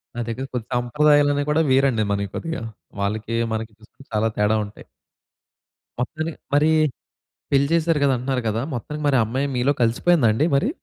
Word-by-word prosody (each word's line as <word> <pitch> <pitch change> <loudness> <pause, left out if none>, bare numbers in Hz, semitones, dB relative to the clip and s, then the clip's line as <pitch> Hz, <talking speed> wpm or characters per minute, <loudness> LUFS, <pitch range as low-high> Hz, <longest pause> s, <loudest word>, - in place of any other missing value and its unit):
నా - - -4
దగ్గర 125 +4 -4
కొన్ని 120 -3 -3
సంప్రదాయాలనేవి 145 +3 +3
కూడా 155 +2 +3
వేరండి 130 -5 +3
మనయి 100 -1 -2
కొద్దిగా. 165 -4 -4 0.4
వాళ్ళకి 110 +3 -2 0.2
మనకి 110 0 -4
చూసుకుంటే 110 +5 -19
చాలా 110 +1 +2
తేడా 105 +1 +2
ఉంటాయి. 100 - -13 1.2
మొత్తానికి 160 +5 -3 0.2
మరి 155 +2 +4 0.8
పెళ్లి 140 0 +3
చేసారు 165 -2 +2
కదా 140 - +3
అంటనారు 130 +1 -2
కదా! 110 +2 -1
మొత్తానికి 150 +5 -5
మరి 140 - +3
ఆ - - +3
అమ్మాయి 130 +6 -1
మీలో 130 +4 +2
కలిసిపోయిందా 120 +5 +3
అండి 140 +8 +1
మరి? 180 - +2
130 Hz, 160 wpm, -22 LUFS, 115-150 Hz, 1.2 s, మరి